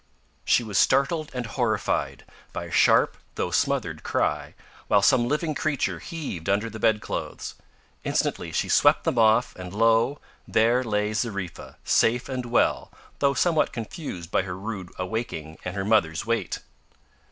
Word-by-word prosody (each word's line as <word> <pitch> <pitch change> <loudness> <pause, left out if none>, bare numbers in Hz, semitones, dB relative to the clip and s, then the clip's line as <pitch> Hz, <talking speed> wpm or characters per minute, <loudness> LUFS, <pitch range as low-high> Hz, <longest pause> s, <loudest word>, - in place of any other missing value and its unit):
She 120 - +3
was 105 -4 0
startled 155 +3 +2
and 125 -1 -4
horrified 105 - -1 0.3
by - - -4
a - - -9
sharp, - - +4 0.2
though - - -2
smothered - - 0
cry, - - -1 0.3
while 100 - +4
some 120 +1 +4
living 150 +3 0
creature 135 - -1
heaved 95 - -6
under 105 +3 +1
the 110 - -8
bed 110 -1 +2
clothes. - - -5 0.5
Instantly - - -1
she - - -1
swept - - +4
them 120 - 0
off, 110 +2 +4
and 90 +1 -8
lo! 115 +5 +3 0.3
there 120 +3 +3
lay 105 -2 -1
Zariffa 100 -6 -4
safe 120 +2 +2
and 130 -2 -3
well, 120 - +1 0.3
though 140 -1 +2
somewhat 160 +3 +2
confused 110 - -6
by - - +3
her 90 -1 -6
rude 95 -2 -6
awaking 90 -5 -4
and 90 +1 -5
her 95 -1 -2
mother's 100 -6 +2
weight. 115 0 -1
110 Hz, 150 wpm, -25 LUFS, 100-125 Hz, 0.5 s, sharp